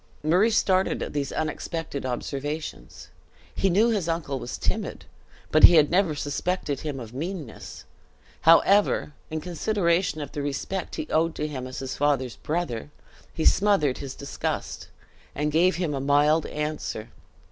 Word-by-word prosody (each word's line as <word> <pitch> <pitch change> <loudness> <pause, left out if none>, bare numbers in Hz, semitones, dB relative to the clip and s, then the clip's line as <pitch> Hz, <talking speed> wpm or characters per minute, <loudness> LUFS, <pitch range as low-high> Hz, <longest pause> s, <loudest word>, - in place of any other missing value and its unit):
Murray 180 +8 +4
started 190 -3 +2
at - - -6
these 145 -1 -2
unexpected 155 -2 -3
observations. 140 - -5 0.4
He 195 - +1
knew 210 +6 +4
his 195 -7 -1
uncle 155 -5 -2
was 120 - -5
timid, - - -3 0.5
but 155 - +9
he 175 - +7
had 150 -1 +5
never 180 -4 +2
suspected 145 +1 -2
him 150 -4 -4
of 115 -2 -9
meanness; 155 - -6 0.6
however, 165 0 +4 0.2
in 155 0 -3
consideration 175 -1 0
of 145 - -6
the 145 - -4
respect 145 +7 -3
he 320 - -3
owed 165 +1 +2
to 150 - -2
him 130 -4 -5
as 130 - -8
his 135 -1 -5
father's 135 -4 0
brother, 150 -7 -3 0.4
he 160 - -3
smothered 190 -10 +3
his 135 -2 -6
disgust, 140 - -4 0.5
and 150 +1 -1
gave 175 +4 +3
him 170 -4 -1
a 135 - -2
mild 145 +3 +3
answer. 150 -7 -4
155 Hz, 150 wpm, -26 LUFS, 140-175 Hz, 0.6 s, but